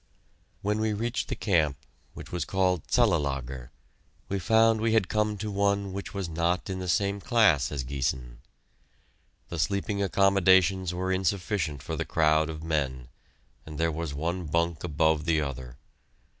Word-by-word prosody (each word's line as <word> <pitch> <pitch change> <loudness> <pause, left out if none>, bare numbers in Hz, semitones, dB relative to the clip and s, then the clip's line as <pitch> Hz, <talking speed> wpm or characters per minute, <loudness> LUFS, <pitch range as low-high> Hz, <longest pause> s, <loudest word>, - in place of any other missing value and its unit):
When 105 +1 0
we 110 0 0
reached 115 +4 -2
the - - -3
camp, 80 - +1 0.4
which - - -10
was 90 -1 -2
called 90 -3 0
Cellelager, 65 -3 0 0.6
we 100 0 -1
found 110 +3 +3
we 115 0 +1
had 110 -5 +3
come 105 0 0
to 105 +1 -4
one 100 -1 0
which 100 +1 -6
was 100 -3 -4
not 85 +4 -1
in 95 - -4
the 90 -1 -4
same 100 +3 +1
class 100 - +3
as 70 -3 -3
Giessen. 65 -2 -3 1.1
The 85 - -5
sleeping 100 +5 -1
accommodations 95 -2 +3
were 95 +1 -2
insufficient 95 -5 -1
for - - -4
the - - -2
crowd 80 -1 +2
of 80 0 -6
men, 65 -6 -2 0.5
and 75 -2 -9
there 80 +1 +1
was 80 0 -4
one 85 +4 -2
bunk 85 +1 0
above 80 -2 +1
the 80 -2 +2
other. 65 -4 -5
85 Hz, 155 wpm, -27 LUFS, 75-100 Hz, 1.1 s, found